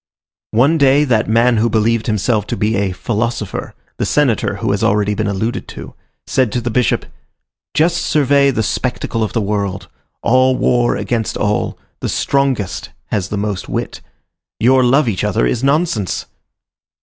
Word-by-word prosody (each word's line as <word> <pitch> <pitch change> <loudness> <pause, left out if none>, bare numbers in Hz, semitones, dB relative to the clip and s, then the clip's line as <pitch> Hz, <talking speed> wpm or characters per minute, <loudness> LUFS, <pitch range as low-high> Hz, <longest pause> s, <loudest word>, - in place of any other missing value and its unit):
One 140 +9 +3
day, 140 +1 +5
that 115 -7 +1
man 115 +1 +3
who 115 +2 +2
believed 110 +1 +1
himself 105 0 0
to - - -3
be 110 +2 0
a 100 -1 0
"philosopher," 110 +1 -3 0.2
the - - -1
senator - - +1
who - - -2
has - - -1
already 105 0 +2
been 105 0 -1
alluded 110 +5 -2
to, - - -9 0.3
said 130 -5 +1
to 125 - 0
the 120 0 -3
Bishop: 125 +1 +1 0.7
"Just 170 +3 +3
survey 140 -4 +3
the 120 -4 0
spectacle 120 0 -2
of 110 - -3
the 115 - +1
world: 100 -2 -2 0.3
all 130 +2 +3
war 120 -1 +2
against 115 -3 -2
all; 105 0 -1 0.2
the - - -3
strongest 130 -10 -1 0.2
has 100 -3 -1
the 105 - -3
most 100 -2 -3
wit. - - -4 0.6
Your 130 +2 +4
love 130 +3 +3
each 100 -5 -1
other - - +1
is 85 - -1
nonsense." 140 - 0
115 Hz, 160 wpm, -17 LUFS, 105-130 Hz, 0.7 s, day